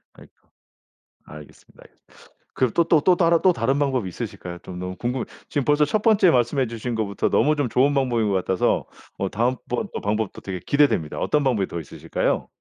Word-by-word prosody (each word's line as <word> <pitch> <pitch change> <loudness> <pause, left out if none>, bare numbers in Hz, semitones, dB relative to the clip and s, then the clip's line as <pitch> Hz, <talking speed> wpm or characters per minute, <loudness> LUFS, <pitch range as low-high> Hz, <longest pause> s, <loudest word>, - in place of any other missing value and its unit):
아이고. - - -17 1.0
알겠습니다, 75 -1 -14
알겠습니다. - - -25 0.5
그럼 130 -3 +1
또 170 - +3
또 155 - +4
또 180 +3 +4
따르 170 -1 +4
또 185 - +6
다른 135 +3 0
방법이 130 -7 0
있으실까요? 85 0 -7
좀 90 - -9
너무 90 0 -5
궁금해요. 120 +4 -3 0.2
지금 140 -3 -1
벌써 150 0 +3
첫 210 +8 0
번째 210 -4 +4
말씀해 130 +1 +1
주신 115 +1 -5
것부터 100 -3 -1
너무 155 +1 +3
좀 145 -3 0
좋은 135 +5 +3
방법인 125 -5 +1
것 - - 0
같아서 95 0 0 0.3
뭐 - - -2
다음번 125 +2 -2
어 - - -4
방법도 105 0 -2
되게 95 -2 -5
기대됩니다. 140 - +1
어떤 150 -1 +1
방법이 115 -8 +1
더 85 - -5
있으실까요? 80 - -2
125 Hz, 435 characters per minute, -23 LUFS, 100-145 Hz, 1.0 s, 또